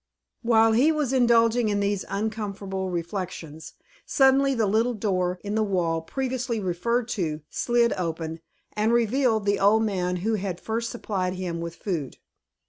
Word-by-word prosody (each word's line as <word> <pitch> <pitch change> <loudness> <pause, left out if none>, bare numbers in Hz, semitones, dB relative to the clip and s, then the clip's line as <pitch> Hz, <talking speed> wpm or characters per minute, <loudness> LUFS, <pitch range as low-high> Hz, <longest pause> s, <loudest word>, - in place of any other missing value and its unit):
While 225 -1 +4
he 255 +8 +4
was 300 -4 -1
indulging 235 -2 +4
in 205 -1 0
these 200 -1 -1
uncomfortable 200 -2 -3
reflections, 170 -3 -5 0.3
suddenly 270 0 +3
the 225 -2 +2
little 225 +4 +1
door 185 -4 -1
in 205 0 -3
the 220 - +1
wall, 175 -6 0
previously 250 +3 -3
referred 220 +6 -1
to, 160 -8 -2
slid 240 -1 +2
open, 165 -2 -4 0.4
and 215 +2 +1
revealed 235 -2 +2
the 200 0 +1
old 210 +3 +4
man 180 -4 -1
who 225 - +1
had 190 -4 -3
first 230 +1 -3
supplied 190 -6 -3
him 175 -2 -4
with 170 0 -5
food. 165 -10 -4
205 Hz, 150 wpm, -25 LUFS, 180-235 Hz, 0.4 s, While